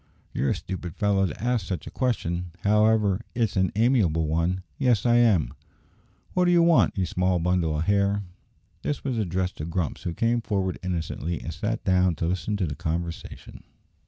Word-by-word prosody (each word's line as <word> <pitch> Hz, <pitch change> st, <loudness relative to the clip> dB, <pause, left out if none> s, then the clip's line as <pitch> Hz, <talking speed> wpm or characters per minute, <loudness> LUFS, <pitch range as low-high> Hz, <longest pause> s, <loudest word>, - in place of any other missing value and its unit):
"You're 70 Hz, -, 0 dB
a -, -, +1 dB
stupid 90 Hz, -2 st, -6 dB
fellow 100 Hz, -2 st, +2 dB
to 80 Hz, -, -7 dB
ask 120 Hz, -6 st, 0 dB
such 90 Hz, -2 st, -4 dB
a -, -, -8 dB
question; 90 Hz, -9 st, -2 dB
however 105 Hz, 0 st, +3 dB
it's 115 Hz, -4 st, 0 dB
an 95 Hz, -1 st, +2 dB
amiable 105 Hz, -, +2 dB
one. 85 Hz, +4 st, 0 dB, 0.2 s
Yes, 120 Hz, -5 st, +2 dB
I 120 Hz, 0 st, +5 dB
am." 100 Hz, -, +3 dB, 0.8 s
"What 180 Hz, -1 st, +3 dB
do 175 Hz, -, +4 dB
you 170 Hz, -1 st, +5 dB
want, 170 Hz, -9 st, +4 dB
ye 95 Hz, -, +1 dB
small 90 Hz, +1 st, +1 dB
bundle 85 Hz, -2 st, +1 dB
o' -, -, -1 dB
hair?" 100 Hz, +2 st, +1 dB, 0.6 s
This 145 Hz, -, -3 dB
was 130 Hz, -4 st, -1 dB
addressed 95 Hz, -2 st, -1 dB
to 75 Hz, -, -4 dB
Grumps, 85 Hz, -2 st, -3 dB
who 85 Hz, -, -4 dB
came 115 Hz, +1 st, +1 dB
forward 95 Hz, -5 st, -2 dB
innocently, 85 Hz, -2 st, -3 dB
and 80 Hz, -, -5 dB
sat 105 Hz, +8 st, -3 dB
down 90 Hz, -2 st, +3 dB
to 85 Hz, -, -2 dB
listen 90 Hz, +4 st, -1 dB
to 95 Hz, -, 0 dB
the 75 Hz, -, -3 dB
conversation. 85 Hz, +3 st, -5 dB
95 Hz, 185 wpm, -26 LUFS, 85-110 Hz, 0.8 s, I